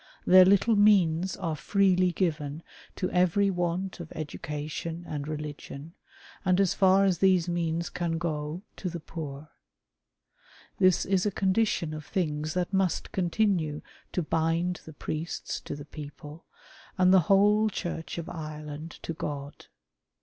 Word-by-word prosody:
Their 185 0 +8
little 200 +4 +4
means 190 -4 +4
are 165 -5 -2
freely 185 +3 +2
given 155 -4 -2 0.3
to 185 - -2
every 185 +3 +3
want 180 +1 -2
of 170 -2 -8
education 155 +2 -5
and 145 -1 -4
religion, 150 0 -7 0.5
and, 185 -1 +3
as 195 -3 +3
far 195 0 +4
as 185 -4 +1
these 185 -3 +4
means 170 -1 -1
can 170 -2 -2
go, 160 +1 -3
to 185 - -3
the 170 0 -5
poor. 150 -2 -7 1.3
This 185 -2 +4
is 190 +1 +1
a - - 0
condition 190 -4 +1
of 155 0 -6
things 155 -2 -2
that 180 +1 -1
must 190 -2 0
continue 175 -5 0 0.3
to 180 - 0
bind 165 +3 0
the 160 - -10
priests 155 +3 -4
to - - -4
the 145 0 -9
people, 150 +1 -10 0.5
and 185 0 +5
the 190 - +8
whole 210 +2 +5
Church 170 -5 -5
of 170 - -5
Ireland 155 -1 -7
to 165 - -3
God. 145 -2 -6
170 Hz, 140 wpm, -28 LUFS, 155-185 Hz, 1.3 s, Their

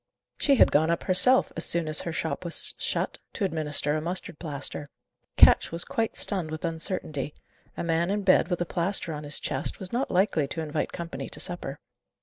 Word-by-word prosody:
She 280 - +3
had - - +5
gone 155 +2 +3
up 170 - -1
herself, 190 +8 +5
as 165 - +2
soon 170 -2 +3
as 155 0 +2
her 170 - -4
shop 160 +2 -3
was 170 -1 0
shut, - - -2
to 200 - -1
administer 150 -4 0
a 155 - -2
mustard 170 -2 -5
plaster. 145 -2 -4 0.5
Ketch - - +6
was 165 +1 +3
quite 225 -1 -2
stunned 185 -6 +2
with 155 +2 -5
uncertainty. 160 -3 -3 0.4
A - - -3
man 170 +1 0
in 205 +1 -1
bed, 185 -3 +4
with 175 -1 -2
a - - 0
plaster 175 0 -1
on 150 0 -6
his 145 0 -2
chest, 130 - -2
was 190 0 -6
not 255 +3 -1
likely 180 -6 +1
to 160 - -4
invite 155 -1 -3
company 170 -1 -6
to - - -9
supper. 145 -5 -3
165 Hz, 200 wpm, -26 LUFS, 155-185 Hz, 0.5 s, Ketch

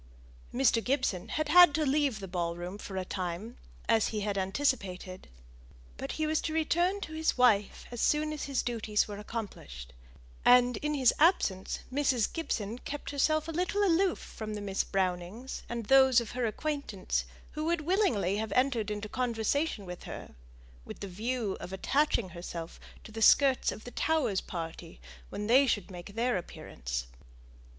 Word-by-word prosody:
Mr. 245 -3 +3
Gibson 255 -9 0
had 310 -1 -1
had 350 -2 +8
to 310 - +1
leave 275 -4 +1
the 195 - -6
ball 170 -2 -2
room 180 +4 -6
for 195 -2 -7
a 185 - -2
time, 185 +6 -4 0.3
as 225 -2 +3
he 215 -2 -3
had 205 0 -1
anticipated, 195 -3 -2 0.7
but - - -5
he 310 - -1
was 310 0 +1
to 315 - -3
return 345 +5 +1
to 315 - -6
his 315 -2 0
wife 215 -5 +3
as 240 - -4
soon 305 0 +2
as 300 - -4
his 275 -2 -1
duties 220 -3 0
were 205 -1 -7
accomplished; 130 - -7 0.5
and, 245 -1 +6
in 300 0 -2
his 260 -4 +4
absence, 250 - +2
Mrs. 260 -5 +1
Gibson 235 -8 -3
kept 290 +2 -6
herself 310 +2 +1
a - - -3
little 365 +5 0
aloof 370 0 +3
from 215 -1 -7
the - - -4
Miss 195 -1 -1
Brownings 190 +6 -2
and 235 -2 -4
those 265 +1 +6
of 235 -3 -6
her 245 -2 -1
acquaintance 280 -5 -2 0.3
who 305 0 -4
would 340 0 +1
willingly 295 - +1
have 220 0 -3
entered 250 -4 +1
into 210 0 -4
conversation 240 +1 -1
with 180 -1 -8
her, - - -8 0.5
with - - -10
the 200 - -4
view 220 +2 -2
of 180 - -8
attaching 235 +1 +1
herself 170 -1 -7 0.2
to - - -11
the 225 +1 -6
skirts 270 +3 +5
of 215 - -9
the 245 - -9
Towers' 260 -13 +1
party, 165 - -7 0.3
when 210 - -4
they 260 +5 +5
should 205 -5 -1
make 180 +3 -9
their 240 -1 +1
appearance. - - -5
230 Hz, 170 wpm, -30 LUFS, 195-290 Hz, 0.7 s, had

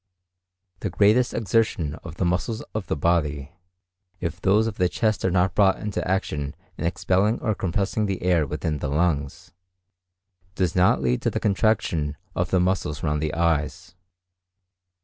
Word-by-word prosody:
The - - -2
greatest 110 +5 +3
exertion 105 -8 0
of 80 - -8
the 90 - -1
muscles 95 +6 -1
of 110 -3 -3
the - - -1
body, 75 -2 0 0.7
if 85 -2 -4
those 105 +3 +3
of 115 -2 -4
the 90 -1 +2
chest 110 0 0
are 95 - +2
not 90 0 +2
brought 100 -1 +4
into 105 -2 -3
strong 90 - -2
action 75 -7 -2 0.2
in 85 - -2
expelling 95 +5 +1
or 110 - 0
compressing 100 +3 -1
the 95 -3 -3
air 85 -5 +2
within 75 +1 -3
the 75 - -3
lungs, 75 -2 -1 1.0
does 90 -3 0
not 90 -7 +3
lead 60 -1 +1
to - - +1
the - - -2
contraction 95 -8 +1 0.2
of 90 0 0
the 95 - +2
muscles 90 -5 -1
round 75 -1 0
the 75 -1 -2
eyes. 80 0 -1
90 Hz, 165 wpm, -24 LUFS, 75-100 Hz, 1.0 s, brought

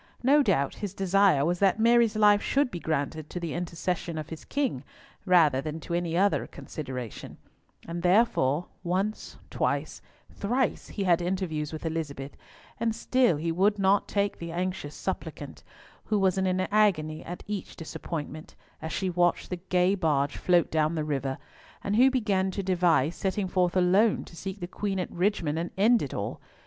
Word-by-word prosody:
No 285 +4 +5
doubt 170 - +1
his 200 -2 -4
desire 195 -6 +3
was 175 +1 0
that 200 +1 +3
Mary's 230 -1 +4
life 210 -1 +5
should 280 -2 +1
be 175 - -5
granted 155 -1 -2
to 180 - -5
the 170 -3 -4
intercession 170 -1 -3
of 155 0 -5
his 160 -2 -8
king 265 - -1 0.4
rather 155 -7 +5
than 155 +3 -5
to 170 - -6
any 170 -1 -1
other 200 +2 +2
consideration; 125 - -7 0.5
and 170 +1 -4
therefore 180 - +3 0.2
once, 190 +4 -2
twice, - - -1 0.3
thrice, 245 +5 -1
he 200 - -4
had 175 -2 +3
interviews 175 -4 -2
with 155 +1 -7
Elizabeth, 145 -4 -4 0.4
and 225 -1 0
still 245 - +2
he 165 +2 -2
would 200 +5 +2
not 195 0 +3
take 200 0 -1
the 170 0 -6
anxious 180 -4 -3
suppliant, - - -5 0.4
who 215 - +1
was 190 -2 +2
in 190 0 0
an 185 0 +1
agony 170 -8 +2
at 175 +1 -7
each 205 -3 -5
disappointment, 155 -1 -6 0.3
as 160 - -5
she 190 - -1
watched 175 0 +1
the 180 - -2
gay 180 +1 +3
barge 150 -6 +1
float 175 -2 +2
down 155 +1 +1
the 155 -1 -1
river, 135 -3 -2 0.5
and 200 - -1
who 255 +4 +6
began 205 -7 +1
to 195 +1 -4
devise 175 -5 +2
setting 190 0 -1
forth 180 0 +1
alone, 190 +5 +3
to - - -14
seek 190 +3 -6
the - - -2
Queen 195 +1 -3
at 180 - -3
Richmond 175 -4 0
and 170 +1 -3
end 225 +4 +4
it - - -4
all! - - -4
180 Hz, 175 wpm, -27 LUFS, 160-200 Hz, 0.5 s, who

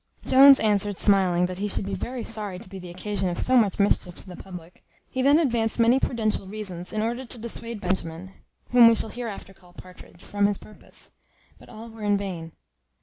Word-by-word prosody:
Jones 275 +1 +8
answered, 205 -2 0
smiling, 185 -3 +2
that 180 0 -6
he 205 - -1
should 200 - -3
be 200 - -4
very 240 +6 -5
sorry 210 -4 -5
to 200 - -12
be 190 0 -9
the 180 -1 -10
occasion 190 +1 -3
of 175 - -4
so 255 - +1
much 215 -6 +3
mischief 195 -3 +1
to - - -13
the 180 - -9
public. 180 -2 -12 0.3
He 260 - -2
then 280 +3 +5
advanced 235 -8 0
many 235 +3 +4
prudential 220 -6 -2
reasons, 190 -4 -6
in 215 0 -2
order 240 +3 -3
to 250 0 -4
dissuade 230 0 -4
Benjamin 180 -1 -4 0.4
(whom 240 -1 +8
we 230 - +5
shall 220 - -4
hereafter 225 -5 -7
call 180 -2 -21
Partridge) 180 -1 -15
from 205 0 0
his 205 -1 -1
purpose; 215 - -13 0.5
but - - -17
all 220 +2 -10
were 225 -1 -13
in 205 -1 +2
vain. 175 -5 -6
205 Hz, 205 wpm, -25 LUFS, 185-230 Hz, 0.5 s, Jones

